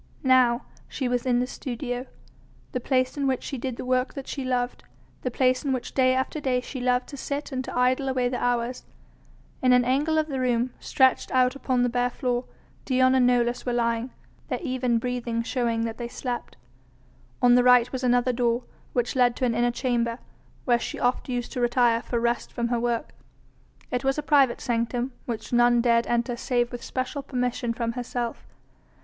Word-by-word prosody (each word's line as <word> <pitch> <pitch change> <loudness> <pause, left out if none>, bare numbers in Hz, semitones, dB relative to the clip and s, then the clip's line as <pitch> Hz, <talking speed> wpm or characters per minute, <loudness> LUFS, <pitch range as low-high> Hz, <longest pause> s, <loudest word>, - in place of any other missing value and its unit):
Now 255 -2 +4 0.2
she 265 - -3
was 245 +1 -1
in 245 -1 +3
the - - +1
studio. 250 0 -5 0.6
The 250 - -2
place 255 +2 0
in 280 -1 0
which 260 -2 0
she 270 - -5
did 255 0 -3
the - - -6
work 255 +1 0
that 275 -2 -6
she 275 - -4
loved, 250 -1 -1 0.4
the 255 - -1
place 255 +2 +1
in 275 -2 0
which 255 -2 -4
day 255 -1 +3
after 260 +4 -1
day 255 -3 +1
she 255 +1 -7
loved 250 0 +1
to 280 - -8
sit 285 +2 -4
and 260 -1 -2
to - - -5
idle 255 +2 +2
away 255 -1 +1
the 245 0 -3
hours. 245 0 0 0.8
In 255 -1 +5
an 250 -1 +4
angle 290 +5 +1
of 310 0 +2
the 270 -3 -3
room, 245 -1 +1
stretched 260 -1 +2
out 255 0 +3
upon 255 -2 0
the - - +3
bare 245 +1 +1
floor, 245 0 -2 0.4
Dion 255 -1 +3
and 255 -2 +4
Nolus 240 -1 +1
were 245 - -1
lying, 235 +1 0 0.4
their - - -1
even 255 -4 0
breathing 235 -1 -2
showing 230 -2 0
that 225 0 -5
they 240 - -3
slept. 245 0 -5 0.8
On 245 -1 +5
the 245 0 +5
right 250 -1 +5
was 260 -1 -4
another 245 0 +3
door, 240 0 +1 0.3
which 245 +1 0
led 245 -2 +3
to 255 - 0
an 240 - +1
inner 240 +1 +2
chamber, 235 -2 -1 0.5
where 240 -2 +3
she - - -5
oft 250 +2 0
used 245 -1 -3
to 250 - -3
retire 240 -1 +3
for 240 -1 -2
rest 235 +1 -1
from 235 -1 -2
her 240 -1 +1
work. 235 -1 -2 0.8
It 250 +1 -1
was 270 +1 +1
a 300 - -2
private 280 -5 +3
sanctum 240 +2 -1 0.2
which 225 -1 -5
none 240 0 +5
dared 235 -1 +3
enter 240 0 0
save 240 -1 0
with 245 -1 -7
special 270 +2 -3
permission 250 -3 -2
from 230 0 -2
herself. 240 -1 -4
250 Hz, 200 wpm, -26 LUFS, 240-255 Hz, 0.8 s, In